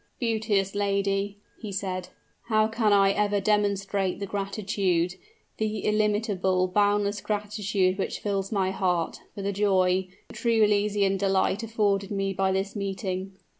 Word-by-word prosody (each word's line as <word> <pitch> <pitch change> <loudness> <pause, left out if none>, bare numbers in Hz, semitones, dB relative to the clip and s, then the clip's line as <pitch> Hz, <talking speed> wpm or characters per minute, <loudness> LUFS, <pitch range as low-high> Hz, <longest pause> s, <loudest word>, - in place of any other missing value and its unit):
"Beauteous 215 -5 0
lady," 200 0 0 0.2
he 215 -3 -5
said, 185 -2 -3 0.4
"how 215 -2 +3
can 225 -1 +1
I 195 -1 +5
ever 205 0 +1
demonstrate 200 -2 0
the 200 - -3
gratitude 195 -3 -1 0.4
the 215 0 -1
illimitable, 205 -3 +1
boundless 205 +1 +1
gratitude 205 -2 -1
which - - -2
fills 195 -2 -2
my 190 -3 +1
heart, 180 -4 -1 0.2
for 200 - -5
the 200 +1 -1
joy, 190 -2 +2 0.2
the - - -11
truly 230 -2 +2
elysian 205 -1 +2
delight 195 +1 +1
afforded 205 -3 0
me 195 -1 -1
by 190 0 +1
this 195 +2 -2
meeting?" 195 -1 -3
200 Hz, 135 wpm, -26 LUFS, 190-210 Hz, 0.4 s, I